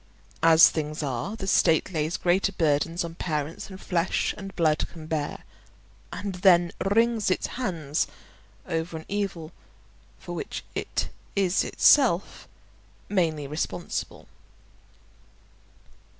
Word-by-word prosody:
As 165 0 +8
things 155 0 -3
are, 135 - -3
the 200 - -6
state 175 -2 +3
lays 155 +1 -1
greater 185 +3 +2
burdens 165 0 +1
on 165 - -7
parents 155 -2 -3
than 190 - -9
flesh 180 -2 0
and 195 -1 -9
blood 155 -3 +2
can 160 -2 -10
bear, 155 -2 -3 0.7
and 200 -1 -4
then 175 -3 +5
wrings 225 +1 +2
its 185 - 0
hands 165 - -2 0.6
over 165 -1 -2
an 160 - -10
evil 195 -6 -3 0.7
for - - -8
which - - -5
it - - -2 0.3
is 190 -2 +2
itself 230 -11 +3 0.6
mainly 160 -7 0
responsible. 155 +4 -4
170 Hz, 115 wpm, -26 LUFS, 155-195 Hz, 0.7 s, As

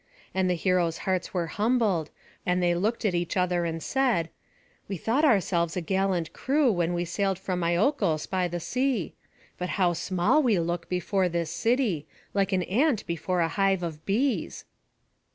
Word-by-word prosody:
And 185 -1 +1
the 180 - +2
heroes' 175 -2 +1
hearts 185 -1 -1
were 175 -2 -1
humbled, 205 -4 +1 0.3
and 180 0 +1
they 175 0 +3
looked 215 +7 -1
at 200 - +2
each 175 +2 -1
other 180 -1 +1
and 165 -1 -3
said: 245 -12 +1 0.6
"We 195 - -4
thought 235 - 0
ourselves 185 - +2
a - - 0
gallant 190 -1 0
crew 275 -1 +2
when 175 -2 0
we 175 0 -1
sailed 195 +2 -1
from 180 -2 -3
Iolcos 175 - +1
by 185 -1 0
the 175 0 -4
sea; 250 - -1 0.5
but 180 0 -3
how 180 -3 +3
small 180 - +2
we 235 -8 +3
look 170 0 -2
before 185 +1 0
this 170 -1 -2
city, 225 - 0 0.3
like 200 0 +1
an 185 -1 +1
ant 240 - +1
before 170 +1 -1
a 165 - +3
hive 195 0 +1
of 160 -2 -5
bees." 245 +7 0
185 Hz, 170 wpm, -27 LUFS, 170-210 Hz, 0.6 s, they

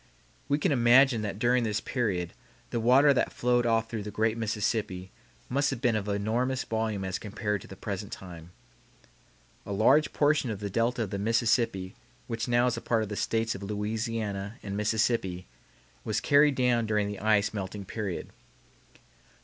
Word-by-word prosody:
We 145 - +3
can 150 - +1
imagine 125 -1 +5
that 100 -2 -4
during 120 +2 +2
this 110 -2 0
period 100 -9 -2 0.4
the 115 - -1
water 130 +5 +5
that 130 - 0
flowed 120 0 +1
off 115 -1 +2
through 115 -1 -4
the 105 - -6
great 110 +2 0
Mississippi 105 -4 -2 0.4
must 140 +3 +1
have 135 - -3
been 120 -1 +2
of 105 -1 -2
enormous 115 +6 0
volume 110 -3 -2
as 95 0 -3
compared 105 -1 -3
to - - -12
the - - -10
present - - -5
time. 85 -3 -9 1.1
A - - -8
large 130 +10 +4
portion 145 -3 +2
of 105 -3 -4
the 100 -1 -4
delta 115 +3 +1
of 100 - -6
the 100 - -3
Mississippi 115 -3 +1 0.3
which 115 +2 -3
now 120 0 +3
is 125 -1 0
a - - -5
part 115 -2 +1
of 105 - -6
the 105 - -4
States 115 +1 0
of 95 - -8
Louisiana 105 0 -3
and 100 -1 -5
Mississippi 105 -3 0 0.6
was - - -1
carried 145 0 +4
down 120 -3 +2
during 105 -1 +1
the 100 -1 -5
ice 105 0 +2
melting 100 0 -5
period. 100 -2 -4 0.7
Dr. - - -24
110 Hz, 180 wpm, -28 LUFS, 100-120 Hz, 1.1 s, imagine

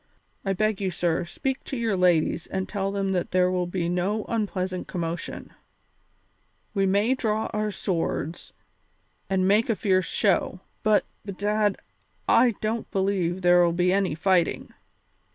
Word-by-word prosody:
I 195 - 0
beg 215 +1 0
you, 190 - 0
sir, 170 -1 0
speak 265 +9 -3
to 265 - -4
your 230 -4 0
ladies 175 -2 +2
and 190 0 -3
tell 195 -1 -2
them 195 -1 -1
that 180 -2 -1
there 185 0 +2
will 180 -1 0
be 175 -1 -2
no 185 +5 -1
unpleasant 190 -5 -2
commotion; 170 -1 -5 1.2
we 195 -1 +2
may 205 +6 +3
draw 220 -4 -1
our 215 0 0
swords 175 -4 -3 0.8
and 190 -1 +2
make 210 +4 +3
a 225 - +2
fierce 185 -3 +1
show, 190 -2 +1 0.2
but, 215 -1 +3 0.2
bedad, 205 +1 0 0.5
I 240 -4 +4
don't 220 +1 -2
believe 190 -2 0
there'll 175 -1 +5
be 180 +1 +2
any 190 -6 +1
fighting. 180 +1 +1
190 Hz, 145 wpm, -25 LUFS, 180-210 Hz, 1.2 s, there'll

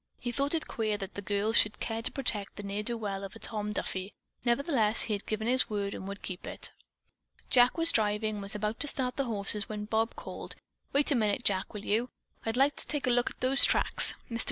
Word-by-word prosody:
He 245 - -3
thought 280 +5 +1
it 315 -1 -2
queer 215 -2 -1
that 195 -1 -7
the 200 - -5
girl 205 +2 -1
should 210 -2 +3
care 225 -1 -3
to - - 0
protect 215 -7 -1
that 205 - -7
ne'er 200 +1 -3
do 235 +2 -2
well 200 -3 -4
of 195 +2 -8
a - - -10
Tom 210 -2 -3
Duffy; 190 -1 -4 0.3
nevertheless 235 -3 +3
he 220 - -1
had 200 - -4
given 220 0 -2
his 255 +2 +4
word 200 -2 -2
and 190 - -7
would 200 0 -7
keep 185 0 -6
it. - - -2 0.8
Jack 245 +2 +5
was 330 0 +7
driving 215 0 0
and - - -5
was 200 +1 -4
about 210 +2 -2
to 290 - +2
start 255 -3 0
the 275 - -1
horses 210 -2 +2
when 210 -1 -4
Bob 220 +1 0
called: - - -7 0.4
"Wait 285 +1 +1
a - - +4
minute, 210 -4 +1
Jack, 190 -1 +1
will 205 - -6
you? 230 +4 0 0.4
I'd 225 +2 -1
like 280 +2 +4
to - - -2
take 295 -2 -2
a 250 - +2
look 240 0 +2
at - - -15
those 260 +2 +4
tracks. - - +4
Mr. 230 -1 -3
220 Hz, 240 wpm, -30 LUFS, 205-245 Hz, 0.8 s, was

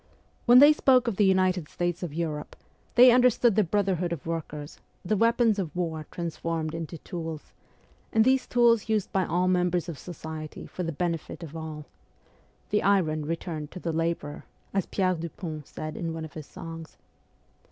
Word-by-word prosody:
When 240 +1 +8
they 290 +3 +9
spoke 260 -4 +4
of 220 -5 -1
the 210 - +4
United 185 -4 +2
States 175 0 -2
of 175 -4 -4
Europe 155 -2 -4 0.4
they 250 +1 +9
understood 245 -2 +4
the 215 - +4
brother 195 +2 +1
hood 175 0 -2
of 170 -5 -5
workers, 150 -3 -5 0.3
the 215 - +1
weapons 230 0 +3
of 170 -5 -4
war 160 -3 -3
transformed 165 -2 -3
into 165 0 -5
tools, 160 -2 -7 0.6
and 220 0 +4
these 260 0 +3
tools 235 -3 +3
used 215 -3 0
by 190 -2 +1
all 180 +2 +1
members 180 -2 +1
of 165 -5 -6
society 160 -3 -7
for - - -7
the 165 -2 -2
benefit 170 +2 -3
of 160 -1 -9
all 155 -2 -6 0.4
' - - -35
the 210 - +2
iron 160 -7 +2
returned 160 -2 -4
to 185 - -7
the 170 -2 -3
labourer,' 165 -2 -2 0.3
as 195 -2 0
Pierre 185 -2 +1
Dupont 160 -2 -6
said 155 0 -6
in 165 -1 -3
one 160 -1 -5
of 155 - -12
his 155 -2 -8
songs. 165 -1 -9
175 Hz, 180 wpm, -27 LUFS, 160-200 Hz, 0.6 s, they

